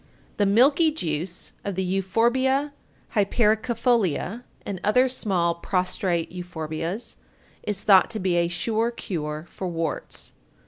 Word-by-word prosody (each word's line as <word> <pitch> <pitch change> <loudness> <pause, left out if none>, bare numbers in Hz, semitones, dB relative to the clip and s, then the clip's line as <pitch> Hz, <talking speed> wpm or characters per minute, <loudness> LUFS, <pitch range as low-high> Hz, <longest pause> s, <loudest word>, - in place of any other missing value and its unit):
The 205 - +3
milky 275 - +5
juice 175 - -4
of 200 -2 -3
the 190 - 0
Euphorbia 240 +10 +1 0.4
hypericifolia 225 - +1 0.2
(and 190 -3 -4
other 250 +5 +4
small 190 -9 0
prostrate 180 0 -1
Euphorbias) 175 +3 -5 0.4
is 205 -2 -2
thought 195 -3 +6
to 220 - -4
be 185 -2 +1
a 170 0 +3
sure 220 +7 0
cure 155 -9 -4
for 185 - -5
warts. 165 -2 -4
195 Hz, 120 wpm, -25 LUFS, 175-235 Hz, 0.4 s, thought